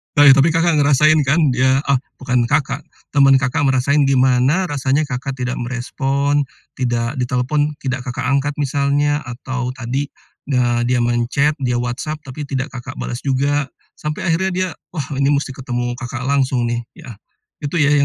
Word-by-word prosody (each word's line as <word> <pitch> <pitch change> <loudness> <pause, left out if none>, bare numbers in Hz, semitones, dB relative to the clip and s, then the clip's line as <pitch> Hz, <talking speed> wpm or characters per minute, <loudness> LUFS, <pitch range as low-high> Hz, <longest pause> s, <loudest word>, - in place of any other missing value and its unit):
Oh 145 - +6
ya, 140 - +9
tapi 140 +3 +5
Kakak 165 -1 +2
ngerasain 150 +2 +4
kan 150 0 +3
dia 130 +2 +2
ah, 135 - +3 0.2
bukan 125 -2 0
Kakak, 145 +3 -1 0.2
teman 140 -2 +5
Kakak 135 +3 +1
ngerasain 135 +2 +2
gimana 130 +5 +3
rasanya 145 -3 0
Kakak 135 -1 -4
tidak 125 -1 -3
merespon, 135 +3 -1 0.3
tidak 120 +1 -1
ditelepon, 130 +5 0
tidak 130 -1 -1
Kakak 125 +1 -5
angkat 140 +2 0
misalnya, 145 +1 +1
atau 125 +1 -4
tadi 130 +3 -3 0.4
ne 120 -3 +1
dia 125 -1 +2
men-chat, 120 +5 +1
dia 125 -3 0
WhatsApp, 125 +6 -3
tapi 140 +2 -7
tidak 135 +2 -3
Kakak 120 -2 -8
bales 120 - -4
juga, 140 +1 +1 0.3
sampai 150 0 -4
akhirnya 190 +4 +1
dia, 185 0 0 0.3
"Wah, 150 - -1 0.2
ini 140 - +3
mesti 140 -1 -2
ketemu 120 -1 -4
Kakak 130 -1 -5
langsung, 130 -2 +1
nih," 120 0 -1 0.2
ya? 155 -8 -10 0.5
Itu 145 +1 -4
ya, 150 -3 +3
135 Hz, 165 wpm, -19 LUFS, 125-145 Hz, 0.5 s, ya